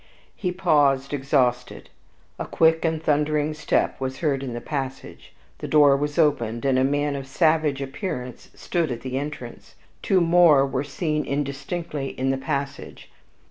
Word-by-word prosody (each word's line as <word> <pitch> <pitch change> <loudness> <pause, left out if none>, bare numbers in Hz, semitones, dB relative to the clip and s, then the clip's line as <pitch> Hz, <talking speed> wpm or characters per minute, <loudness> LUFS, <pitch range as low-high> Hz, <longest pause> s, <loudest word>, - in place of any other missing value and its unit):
He 180 -3 -2
paused, 145 -7 +2
exhausted, 135 -3 0 0.5
a - - -4
quick 160 0 +3
and 160 -1 -1
thundering 150 0 +1
step 155 -2 -1
was 130 0 -3
heard 140 -5 0
in 130 -3 -5
the 120 - -4
passage. 135 -1 -6 0.3
The - - -5
door 145 -2 +5
was 145 +1 -3
opened, 130 -7 +1
and 130 -1 +3
a - - +3
man 145 +1 0
of 135 -1 -6
savage 155 -1 +1
appearance 135 - -6
stood 165 -5 -2
at 120 - -5
the 130 0 -3
entrance, 140 -4 -8 0.3
two 190 - +2
more 170 -5 +5
were 135 0 -2
seen 150 +1 -2
indistinctly 140 +1 -4
in 135 +1 +1
the 135 - -2
passage. 140 -1 -5
145 Hz, 155 wpm, -24 LUFS, 135-155 Hz, 0.5 s, door